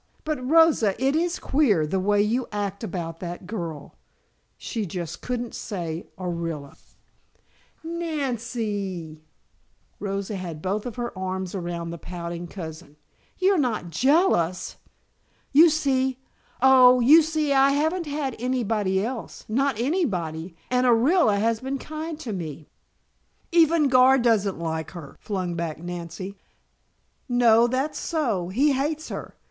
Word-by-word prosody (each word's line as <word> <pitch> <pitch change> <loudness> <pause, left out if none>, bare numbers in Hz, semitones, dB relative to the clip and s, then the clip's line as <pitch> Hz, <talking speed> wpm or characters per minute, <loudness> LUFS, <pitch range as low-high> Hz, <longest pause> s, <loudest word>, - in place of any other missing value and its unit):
But 305 -5 -3
Rosa, 295 -8 +4
it 270 +2 +2
is 345 +2 0
queer, 225 - +2
the 190 +5 -1
way 205 +2 +3
you 235 +4 0
act 200 0 -3
about 165 -6 -5
that 175 0 -6
girl." 170 -8 -6 0.6
She 225 -3 -4
just 170 -1 -5
couldn't 245 -1 -3
say 170 -5 -5
Orilla. 170 -5 -4 1.1
"Nan 320 -7 -2
cee." 200 -9 -4 0.8
Rosa 200 0 -3
had 170 -4 -6
both 205 +6 -3
her 240 -3 -4
arms 185 -1 -4
around 170 -3 -4
the 170 - -7
pouting 170 0 -6
cousin. 160 -3 -9 0.4
"You're 380 -1 +3
not 220 - -1
jealous! 185 - +2 0.7
You 320 +4 +8
see 265 -4 +1 0.5
oh, 255 -1 +7
you 290 +7 +7
see 310 -2 0
I 270 0 +5
haven't 315 +4 0
had 285 -4 -2
any 250 +1 0
body 200 -3 0
else; 245 -1 -6
not 265 +1 0
anybody, 185 - -1 0.2
and 250 0 +3
Orilla 245 - +4
has 225 +2 +1
been 265 +2 -3
kind 310 +2 -6
to 230 -8 -4
me 160 -4 -6 0.4
" - - -45 0.3
"Even 330 -2 +4
Gar 260 0 +6
doesn't 220 -6 +2
like 160 -1 -3
her," 140 -5 -10
flung 185 -4 -3
back 165 -2 -3
Nancy. 175 +3 -7 0.9
"No, 240 -1 +5
that's 265 +5 -1
so. 230 - -1
He 270 +10 +3
hates 300 +4 -1
her. - - -7
220 Hz, 135 wpm, -25 LUFS, 175-275 Hz, 1.1 s, You